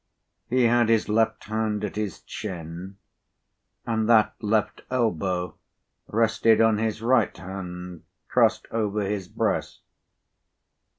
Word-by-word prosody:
He 125 +1 +3
had 120 -1 +4
his 115 -2 +2
left 110 +1 +1
hand 110 -1 -2
at 105 - -3
his 105 -5 -3
chin, 90 -1 -7 0.9
and 110 -1 0
that 110 -2 +5
left 110 0 0
elbow 90 -8 0 0.5
rested 115 0 +3
on 110 -2 +4
his 110 0 -2
right 130 +3 +2
hand 90 -2 -7 0.3
crossed - - +3
over 105 -2 -1
his 100 -2 -3
breast. - - -2
105 Hz, 115 wpm, -25 LUFS, 95-115 Hz, 0.9 s, that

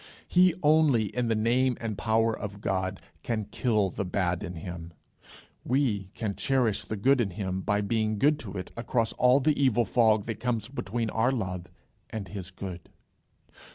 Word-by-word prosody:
He 180 -1 +4
only, 145 -9 +3
in 125 -1 0
the 115 - +1
name 120 +3 +2
and 110 -3 -3
power 110 +1 +1
of 105 -1 -6
God, 95 -1 -2 0.2
can 110 -3 -2
kill 105 -2 0
the 100 - -3
bad 90 -2 -1
in 90 - -5
him; 85 0 -7 0.7
we 115 -7 0
can 105 -3 -2
cherish 125 -6 +1
the 110 - -4
good 130 +5 +3
in 105 - 0
him 95 0 -3
by 105 +2 +1
being 110 +1 0
good 150 +6 +3
to 100 -3 -7
it 90 - -6
across 115 -1 -1
all 125 +2 +4
the 145 0 +2
evil 120 -3 +3
fog 110 -3 +3
that 115 -2 -4
comes 115 -3 -1
between 115 -3 -3
our 115 +3 +2
love 90 -8 -3 0.4
and 105 -4 -6
his 95 -2 -6
good. 90 -2 -8
110 Hz, 175 wpm, -28 LUFS, 95-125 Hz, 0.7 s, He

